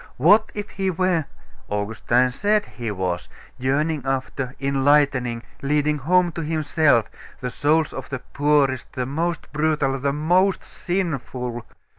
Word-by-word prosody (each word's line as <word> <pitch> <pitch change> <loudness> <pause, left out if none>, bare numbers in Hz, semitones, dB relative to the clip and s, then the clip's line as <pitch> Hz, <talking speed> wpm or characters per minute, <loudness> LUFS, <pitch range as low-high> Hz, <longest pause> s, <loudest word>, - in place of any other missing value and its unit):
What 205 - +5
if 205 0 -4
He 195 -1 -1
were 180 -3 +1 0.4
Augustine 115 +4 +1
said 205 +9 +1
He 120 -3 -6
was 90 -3 -3 0.3
yearning 145 +4 0
after, 135 0 -3
enlightening, 135 -3 +2 0.2
leading 150 +1 +1
home 175 +5 +3
to 165 - -5
Himself, 155 -6 +2 0.3
the 125 -1 -4
souls 155 +4 +1
of - - -7
the 135 - -3
poorest, 140 -1 0
the 125 -1 -2
most 165 +5 -3
brutal, 150 -3 +1
the 140 +1 0
most 180 +6 +2
sinful? 130 - -3
145 Hz, 130 wpm, -23 LUFS, 130-165 Hz, 0.4 s, What